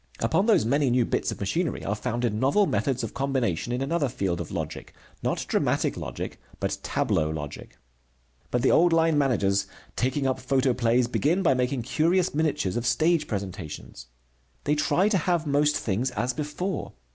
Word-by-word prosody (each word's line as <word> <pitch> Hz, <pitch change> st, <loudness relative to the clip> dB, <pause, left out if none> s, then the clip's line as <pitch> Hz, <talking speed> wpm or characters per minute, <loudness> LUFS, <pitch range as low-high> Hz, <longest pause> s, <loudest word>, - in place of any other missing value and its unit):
Upon 200 Hz, -, +1 dB
those 215 Hz, -, +4 dB
many 140 Hz, +3 st, +2 dB
new 120 Hz, -1 st, +3 dB
bits -, -, -1 dB
of -, -, -7 dB
machinery 160 Hz, -, -1 dB
are 100 Hz, -, 0 dB
founded 120 Hz, +1 st, -1 dB
novel 135 Hz, -, +3 dB
methods 135 Hz, -8 st, 0 dB
of -, -, -4 dB
combination 125 Hz, -7 st, -1 dB
in 125 Hz, +2 st, -1 dB
another 150 Hz, -1 st, 0 dB
field 95 Hz, -7 st, -2 dB
of 85 Hz, -, -6 dB
logic, -, -, -5 dB, 0.3 s
not -, -, -1 dB
dramatic -, -, +1 dB
logic, -, -, -6 dB, 0.2 s
but -, -, -2 dB
tableau 75 Hz, -1 st, 0 dB
logic. 75 Hz, -2 st, -7 dB, 0.7 s
But 120 Hz, -1 st, 0 dB
the -, -, +4 dB
old 175 Hz, +1 st, +5 dB
line 165 Hz, -1 st, +3 dB
managers, 100 Hz, -9 st, +2 dB, 0.3 s
taking 130 Hz, +3 st, 0 dB
up 130 Hz, -1 st, 0 dB
photoplays, 125 Hz, -2 st, +2 dB
begin 160 Hz, +9 st, +1 dB
by 165 Hz, -, +4 dB
making 125 Hz, 0 st, -1 dB
curious 170 Hz, +8 st, +1 dB
miniatures 145 Hz, -, 0 dB
of 120 Hz, 0 st, -1 dB
stage 165 Hz, +5 st, +2 dB
presentations. 90 Hz, -, -6 dB, 0.6 s
They 145 Hz, -, +1 dB
try 175 Hz, +6 st, +2 dB
to 205 Hz, -3 st, +2 dB
have 170 Hz, 0 st, 0 dB
most 145 Hz, +1 st, +2 dB
things 115 Hz, +5 st, -1 dB
as 125 Hz, +1 st, -2 dB
before. 150 Hz, +5 st, -4 dB
130 Hz, 170 wpm, -26 LUFS, 115-155 Hz, 0.7 s, old